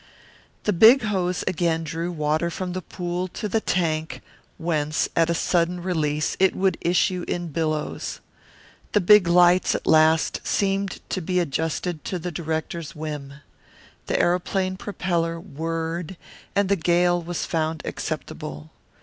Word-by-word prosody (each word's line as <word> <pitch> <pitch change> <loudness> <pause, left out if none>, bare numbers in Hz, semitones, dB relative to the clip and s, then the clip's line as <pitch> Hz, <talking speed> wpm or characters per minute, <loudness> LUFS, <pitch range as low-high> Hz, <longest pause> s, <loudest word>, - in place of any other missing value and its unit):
The 210 - +1
big 225 +8 +7
hose 185 -4 -1
again 165 -1 0
drew 165 +2 -3
water 155 +1 0
from 180 +1 -4
the 185 - -3
pool 175 +1 -4
to 210 +4 -5
the 220 +2 0
tank, 160 -4 -1 0.3
whence, 155 -2 0
at 165 0 +3
a 170 - +1
sudden 175 +1 +1
release, 155 -4 -1
it 190 0 +4
would 190 -2 +1
issue 180 +1 +1
in 175 -1 -3
billows. 155 -1 -2 0.7
The 210 - +5
big 205 0 +6
lights 175 +1 +5
at - - -4
last 160 0 +4
seemed 195 -1 0
to 190 - -1
be 180 +2 0
adjusted 160 +1 -2
to 185 - -2
the 175 +1 -5
director's 160 0 -4
whim. 150 -3 -6 0.7
The - - +1
aeroplane 185 +2 +1
propeller 170 -4 -2
whirred 165 +2 -4 0.4
and 200 -1 +3
the 200 - +3
gale 175 0 +2
was 170 0 -3
found 160 -1 -2
acceptable. 75 +2 -5
170 Hz, 140 wpm, -24 LUFS, 160-185 Hz, 0.7 s, big